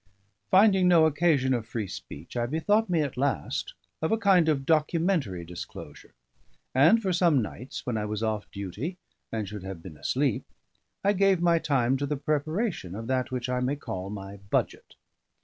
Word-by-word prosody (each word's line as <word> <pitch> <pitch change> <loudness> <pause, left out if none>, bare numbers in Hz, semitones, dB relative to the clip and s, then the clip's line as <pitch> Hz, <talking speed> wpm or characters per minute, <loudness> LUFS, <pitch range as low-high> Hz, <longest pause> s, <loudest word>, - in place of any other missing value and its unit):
Finding 190 -1 +5
no 170 -3 +6
occasion 145 -4 +2
of 115 -3 -2
free 115 -2 -3
speech, 85 - -9
I 120 -1 0
bethought 205 - +1
me 170 -3 +2
at 140 -4 -3
last 135 - -1 0.3
of 160 - 0
a 225 - +3
kind 190 -6 +4
of 135 -3 0
documentary 155 - +1
disclosure; 85 +1 -10 0.6
and 160 - +6
for 190 -4 -1
some 170 -5 +4
nights, 120 +3 -6
when 120 -3 -1
I 105 - -2
was 105 +1 -3
off 110 -2 -2
duty, 105 - -5 0.3
and 110 -3 -2
should 105 0 -7
have 95 -3 -7
been 80 -5 -10
asleep, 130 - 0 0.6
I 200 +1 +4
gave 195 -2 +3
my 170 -1 +3
time 135 -4 +1
to 140 +1 -2
the 145 0 -1
preparation 155 - -2
of 115 +2 -6
that 130 -1 0
which 125 -1 -3
I 125 0 0
may 125 +3 0
call 95 -9 -6
my 100 -1 -7
budget. - - -1
135 Hz, 180 wpm, -27 LUFS, 110-170 Hz, 0.6 s, no